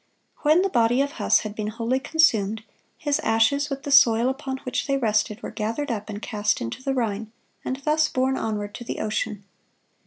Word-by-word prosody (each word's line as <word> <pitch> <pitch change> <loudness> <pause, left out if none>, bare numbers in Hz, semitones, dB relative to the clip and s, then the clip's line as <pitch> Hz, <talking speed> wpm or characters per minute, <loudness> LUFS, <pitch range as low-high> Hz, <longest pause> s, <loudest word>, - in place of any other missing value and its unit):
(144) 295 - 0
When 335 +4 +6
the 390 - -2 0.2
body 245 +3 +2
of 285 - -6
Huss - - +4
had 215 -1 -6
been 215 0 -4
wholly 230 +4 -1
consumed, 220 -9 +2 0.3
his 290 -1 0
ashes, 225 +6 +2
with 275 0 -5
the 285 - -4
soil 240 -3 +6
upon 265 0 -4
which 255 - -2
they 275 -1 +1
rested, 215 -2 0
were - - -5
gathered 230 +6 -3
up 215 -2 -4
and 205 -1 -5
cast 210 -2 0
into 115 - -5
the 270 0 -1
Rhine, 220 -3 -2 0.3
and 260 - -2
thus 310 +1 +3
borne 260 +1 0
onward 210 -4 -3
to - - -7
the 240 - -5
ocean. 215 -1 -2
235 Hz, 205 wpm, -24 LUFS, 215-275 Hz, 0.3 s, When